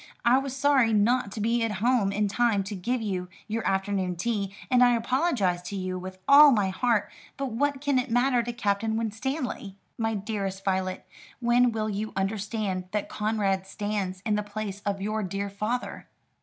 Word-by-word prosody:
I 245 +2 +6
was 270 -1 -5
sorry 270 -5 +4
not 215 +1 +2
to - - -6
be 230 +2 +1
at 225 -2 -1
home 215 0 +2
in 210 +1 +1
time 215 -1 +1
to 205 +2 -5
give 235 +6 -2
you 185 -4 -3 0.2
your 225 +1 -2
afternoon 190 -2 0
tea, 200 +1 -2 0.2
and 250 -1 +6
I 245 -1 +5
apologise 235 - +1
to 200 - -5
you 185 -1 -3
with 185 +1 -8
all 290 +2 +9
my 205 -6 +2
heart; 230 +2 0 0.3
but 275 -2 -3
what 280 +4 0
can 285 -3 +2
it 255 +1 -3
matter 245 +1 +3
to 240 +1 -4
Captain 220 -1 0
Winstanley?" 230 -2 -3 0.2
"My 225 -1 0
dearest 195 -2 -4
Violet, 185 -1 -1 0.3
when 240 0 +3
will 220 -1 -2
you 215 +1 -3
understand 195 -1 -2
that 210 - -1
Conrad 205 -3 -1
stands 200 -3 -3
in 215 - +1
the 210 - +1
place 205 -1 -5
of 195 -1 -1
your 215 +1 -1
dear 200 +1 -3
father?" 215 +5 -3
215 Hz, 185 wpm, -27 LUFS, 195-240 Hz, 0.3 s, all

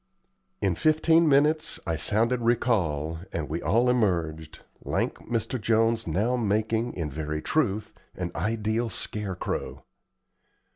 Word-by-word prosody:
In - - +3
fifteen 160 +1 +3
minutes 150 +3 +3
I 85 -3 -1
sounded 115 +8 +1
recall, 90 - +1
and 80 -3 -3
we 80 +3 -3
all 115 +9 +2
emerged, 85 -10 0 0.2
lank - - -1
Mr. 120 +1 -1
Jones 115 0 +2
now 105 +10 +1
making, 110 +1 0
in 80 -5 -3
very 75 +1 -3
truth, 110 -9 0 0.2
an 90 -1 -4
ideal 110 +5 -1
scarecrow. 100 -4 -3
110 Hz, 115 wpm, -27 LUFS, 85-120 Hz, 0.2 s, In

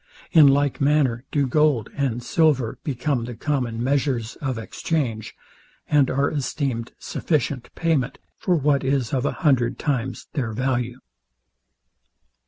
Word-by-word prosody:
In 155 -4 +8
like 140 0 +2
manner 140 -4 +2
do 145 -2 +2
gold 140 -4 +2
and 125 -4 -1
silver 135 -5 +2
become 135 -4 -1
the 120 0 -7
common 120 -3 -2
measures 130 -4 0
of 130 -4 -3
exchange, 115 -2 -3 0.5
and 145 -3 +3
are 140 +2 +1
esteemed 135 -5 -2
sufficient 145 -5 -2
payment 160 -7 0 0.2
for 180 - +2
what 145 -2 +2
is 135 -3 0
of 130 +1 +1
a - - 0
hundred 125 -4 +3
times 130 -3 -2
their 120 -7 -2
value. 125 0 -1
135 Hz, 130 wpm, -23 LUFS, 120-145 Hz, 0.5 s, In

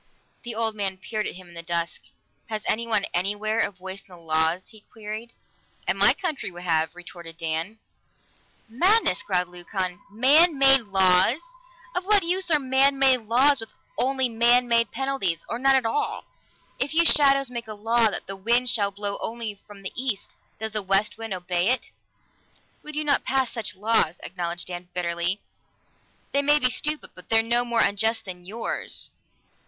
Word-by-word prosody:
The 235 -2 -5
old 225 -1 0
man 195 -2 -2
peered 210 +2 -3
at - - -5
him 185 -1 -12
in - - -13
the 170 - -6
dusk. 170 0 -3 0.5
"Has 215 -1 -4
anyone, 225 -2 +1
anywhere, 205 +5 0
a - - +2
voice 190 0 -6
in - - -29
the 180 -2 -14
laws?" 160 +2 0
he 215 -2 -15
queried. 220 +1 -7 0.6
"In - - +2
my - - +5
country 315 - -3
we 175 -1 -10
have," 160 -1 0
retorted 170 -2 -11
Dan. 165 +6 -3 0.9
"Madness!" 370 - +3
growled 180 -2 -1
Leucon. 180 0 -4
"Man 285 - +4
made 270 -3 +5
laws! 190 +4 +4 0.6
Of 360 - -3
what 410 -1 +5
use 365 +2 -1
are 310 - +5
man 270 0 +2
made 260 -4 +3
laws 265 +5 +4
with 225 - -8 0.2
only 265 - +1
man 240 +2 +3
made 230 -2 +3
penalties, 265 -12 -1
or 235 - -4
none 270 +1 +4
at 260 -3 +2
all? 430 - -2 0.5
If 285 +4 -1
you 335 +1 +5
shadows 275 -4 +4
make 235 -2 -6
a 215 - -7
law 225 +2 +2
that - - -6
the 195 - -6
wind 235 +6 +1
shall 205 -5 +1
blow 200 0 -4
only 225 -2 -4
from 200 -1 -13
the 190 - -5
east, 240 -6 -3 0.2
does 220 +1 -4
the 215 0 +1
west 195 +3 +1
wind 225 -1 -6
obey 180 0 0
it?" 255 - -1 0.9
"We 300 - -4
do 305 0 -2 0.2
pass 260 -2 0
such 210 -6 -3
laws," 195 -5 +1
acknowledged 175 -1 -4
Dan 175 0 -7
bitterly. 175 +2 -1 0.9
"They 280 - +2
may 295 +1 +4
be 255 -3 +3
stupid, 300 +3 0
but 180 - -15
they're 225 0 +4
no 240 +1 +2
more 235 -1 +1
unjust 220 +3 +1
than 180 -2 -9
yours." 220 +5 -3
220 Hz, 180 wpm, -25 LUFS, 185-255 Hz, 0.9 s, my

